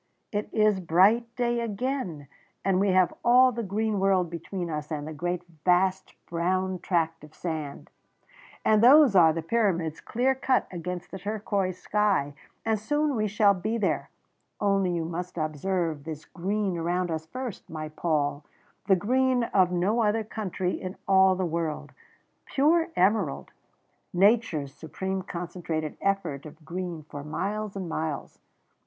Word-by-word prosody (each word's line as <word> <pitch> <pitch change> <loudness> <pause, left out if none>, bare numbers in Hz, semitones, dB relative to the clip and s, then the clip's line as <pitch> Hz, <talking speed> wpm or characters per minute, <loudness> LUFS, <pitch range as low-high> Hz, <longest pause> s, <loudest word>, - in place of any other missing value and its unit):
it 205 0 -2
is 215 -3 +3
bright 190 +7 +4
day 240 -1 0
again, 225 - -3 0.4
and 190 -1 +3
we 200 - +2
have 185 -1 +3
all 255 +2 +6
the 235 0 -3
green 210 0 -1
world 190 -3 +2
between 175 +2 -5
us 150 -2 -4
and 150 -2 -4
the 155 - -5
great 175 +3 -3 0.2
vast 185 +1 +2
brown 185 +2 -1
tract 165 -3 -1
of 150 +1 -14
sand. 155 -5 -5 0.8
And 215 0 +4
those 275 -1 +8
are 165 -3 +7
the 165 0 -3
Pyramids 170 -6 0
clear 255 +3 +1
cut 265 -1 +1
against 180 0 -5
the 190 - -6
turquoise 200 -2 -2
sky, 195 -7 +1 0.3
and 220 -1 +1
soon 295 +5 0
we 215 -1 +1
shall 205 0 +4
be 215 +5 -2
there, 205 -4 -1 0.5
only 195 -3 +2
you 165 -1 -1
must 175 +2 -5
observe 155 0 -1
this 155 -1 -7
green 195 +1 -2
around 175 +1 -1
us 160 0 -4
first, 250 +3 -6
my 155 -1 -5
Paul 150 -2 -1 0.4
the 195 - +6
green 255 +6 +2
of 185 -2 +4
no 190 +6 +1
other 220 +1 +2
country 190 -4 -3
in 185 0 -5
all 190 -1 +5
the 185 0 -1
world 165 -2 -3 0.6
pure 325 +4 +3
emerald 190 -5 +1 0.6
nature's 180 - +2
supreme 190 +6 -4
concentrated 170 -4 -4
effort 175 -8 -1
of 155 +1 -15
green 175 -1 -5
for 145 -2 -7
miles 205 +7 -3
and 190 -2 -4
miles. 155 -3 -4
185 Hz, 150 wpm, -27 LUFS, 165-210 Hz, 0.8 s, those